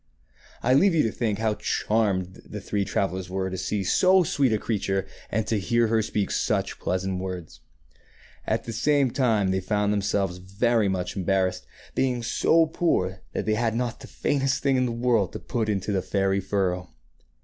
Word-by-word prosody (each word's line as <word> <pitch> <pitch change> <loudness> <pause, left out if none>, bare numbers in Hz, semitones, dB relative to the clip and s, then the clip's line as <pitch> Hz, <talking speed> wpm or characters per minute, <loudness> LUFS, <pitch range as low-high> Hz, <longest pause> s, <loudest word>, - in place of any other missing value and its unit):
I 125 - +3
leave 180 +6 +4
you 155 - +4
to 115 - 0
think 110 -4 -1
how 110 0 +1
charmed 100 -4 -1
the - - -7
three 100 -1 -1
travellers 95 -3 -2
were 95 0 -2
to - - -3
see 100 +2 -1
so 185 - +4
sweet 140 -5 +1
a 110 - +2
creature 95 -3 -1 0.2
and 110 +1 0
to 110 -1 0
hear 115 +3 +1
her 110 0 +3
speak 105 -2 -2
such - - -1
pleasant 95 0 -1
words. 90 -9 -6 0.9
At - - 0
the 115 - -6
same 140 +1 +2
time 110 -8 +2
they 95 - +1
found 105 +2 0
themselves 100 -2 0
very 105 +4 +1
much 90 -1 -2
embarrassed, 95 -1 0 0.3
being 125 -2 0
so 165 +7 +3
poor 95 - 0
that - - -2
they 110 - +1
had 115 0 0
not 120 -1 -2
the - - -11
faintest 135 -1 0
thing 135 -1 +3
in 125 -1 +2
the - - -2
world 115 -5 +1
to - - -5
put 115 -4 -2
into 100 0 -1
the 95 -2 +1
fairy 95 +1 0
furrow. 95 -2 -1
105 Hz, 185 wpm, -25 LUFS, 95-120 Hz, 0.9 s, leave